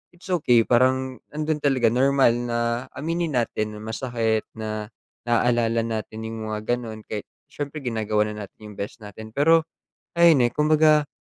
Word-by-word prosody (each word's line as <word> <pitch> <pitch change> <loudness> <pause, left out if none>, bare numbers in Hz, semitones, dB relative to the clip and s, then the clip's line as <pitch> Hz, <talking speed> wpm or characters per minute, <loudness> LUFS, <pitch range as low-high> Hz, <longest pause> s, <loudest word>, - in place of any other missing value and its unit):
it's 180 - -15
okey 125 -9 +4
parang 130 +2 +2
nandun 155 0 -2
talaga 135 -5 +2
normal 135 0 +4
na 120 -1 -2 0.4
aminin 165 0 -2
natin 110 -3 -1
na - - -8
masakit 115 -1 -1
na 110 -1 -4 0.4
naaalala 115 -1 +2
natin 110 -1 -4
yung 110 -1 -5
mga 110 +3 -1
ganun. 110 -3 -8
Kahit 105 -1 -5 0.2
siyempre 145 0 -6
ginagawa 110 -3 0
na 105 -1 -6
natin - - -25
yung - - -13
best 100 +3 -5
natin 110 +2 -10
pero 160 +3 +5 0.6
ayun 165 -7 +6
eh. - - -6
Kumbaga, 150 +1 +4
120 Hz, 155 wpm, -24 LUFS, 110-145 Hz, 0.6 s, ayun